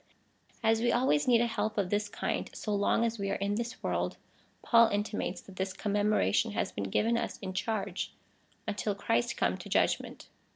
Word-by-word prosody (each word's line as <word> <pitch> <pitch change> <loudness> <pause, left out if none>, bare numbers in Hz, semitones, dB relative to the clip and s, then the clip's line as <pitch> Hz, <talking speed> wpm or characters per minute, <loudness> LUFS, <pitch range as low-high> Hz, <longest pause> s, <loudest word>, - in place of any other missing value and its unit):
As 225 0 +3
we 240 0 +3
always 240 - +2
need 235 -2 +5
a - - +3
help 220 -2 -2
of 195 -3 0
this 205 0 0
kind, - - -2
so 210 - -3
long 205 +3 +2
as 230 -1 -2
we 200 0 -1
are - - 0
in 200 +1 -1
this 235 +3 -4
world, - - -1 0.5
Paul 230 -1 +6
intimates 205 -3 -2
that 190 -2 -14
this 190 0 -2
commemoration 205 - +1
has - - -1
been 100 - -3
given 230 - +2
us 235 - -3
in 190 -2 -6
charge, 200 -1 -2 0.6
until 205 0 -1
Christ 120 -12 0
come - - +1
to - - -9
judgment. - - 0
205 Hz, 190 wpm, -31 LUFS, 195-230 Hz, 0.6 s, Paul